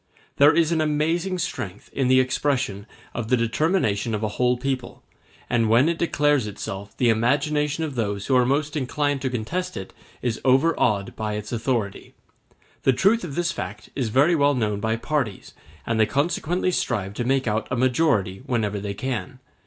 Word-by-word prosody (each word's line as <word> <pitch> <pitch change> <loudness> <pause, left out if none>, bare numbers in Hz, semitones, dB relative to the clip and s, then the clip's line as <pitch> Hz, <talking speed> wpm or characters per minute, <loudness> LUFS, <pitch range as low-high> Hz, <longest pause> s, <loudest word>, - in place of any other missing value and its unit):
There 145 +1 +7
is 165 0 +2
an 160 -2 +2
amazing 165 +5 0
strength 120 - -5
in 135 -2 0
the 130 0 +5
expression 130 -5 0 0.3
of 115 -2 -4
the 125 - +3
determination 115 - +1
of 105 - -4
a 110 - 0
whole 125 +3 +1
people, 130 -1 -4 0.4
and 115 -2 +1
when 120 +6 +5
it 170 0 -1
declares 145 -7 +2
itself 100 0 -7
the 125 - +3
imagination 145 +7 +1
of 155 -3 -3
those 105 -4 -2
who 130 - +2
are 125 - +5
most 145 +4 0
inclined 145 0 -1
to 135 - -1
contest 170 +11 -3
it 95 - -7 0.3
is 120 -3 -1
overawed 130 -7 +2
by 110 -1 -3
its 105 0 -5
authority. 115 -4 -2 0.7
The 135 - +3
truth 200 - +3
of 150 -6 -6
this 175 0 0
fact 105 - -7
is 125 -5 -1
very 140 +9 +4
well 145 -2 +3
known 105 -4 0
by 110 +2 0
parties, 120 -4 -3 0.3
and 115 -1 0
they 110 - +4
consequently 170 - 0
strive 100 - -1
to 120 - -3
make 135 +2 +1
out 110 +1 0
a 130 - -1
majority 125 - +1
whenever 105 -4 0
they 100 0 -4
can. 130 +1 -4
130 Hz, 180 wpm, -24 LUFS, 110-150 Hz, 0.7 s, There